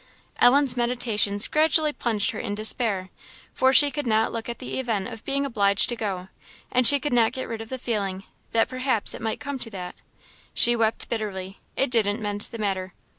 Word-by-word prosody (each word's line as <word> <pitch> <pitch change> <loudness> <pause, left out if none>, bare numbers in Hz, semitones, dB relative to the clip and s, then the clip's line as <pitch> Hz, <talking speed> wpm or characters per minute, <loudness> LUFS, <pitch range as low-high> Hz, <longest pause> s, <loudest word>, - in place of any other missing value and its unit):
Ellen's 260 +1 +4
meditations 230 -4 +2
gradually 310 0 +2
plunged 220 -7 0
her - - -7
in 205 -3 -4
despair; 215 -3 0 0.4
for 260 0 +3
she 285 +2 +6
could 285 0 -4
not 220 0 +1
look 230 0 -5
at 235 - -5
the 260 - -5
event 225 -7 -2
of 225 - -10
being 280 0 -1
obliged 200 -6 +1
to 240 - -2
go, 190 -5 -5 0.4
and 250 -1 +4
she 285 - +6
could 290 0 -3
not 230 -2 +3
get 260 - -5
rid 225 -1 -6
of 225 - -10
the 260 - -4
feeling, 200 -6 -3 0.3
that 225 0 +2
perhaps 255 -4 +2
it - - -9
might 225 -1 -3
come 280 -2 -5
to 230 - -1
that. 180 -4 -7 0.6
She 240 0 +6
wept 225 -1 -1
bitterly 195 -4 -5 0.2
it 270 - 0
didn't 215 -2 +1
mend 205 -1 -4
the 230 - -7
matter. 190 -3 -3
225 Hz, 200 wpm, -24 LUFS, 205-255 Hz, 0.6 s, she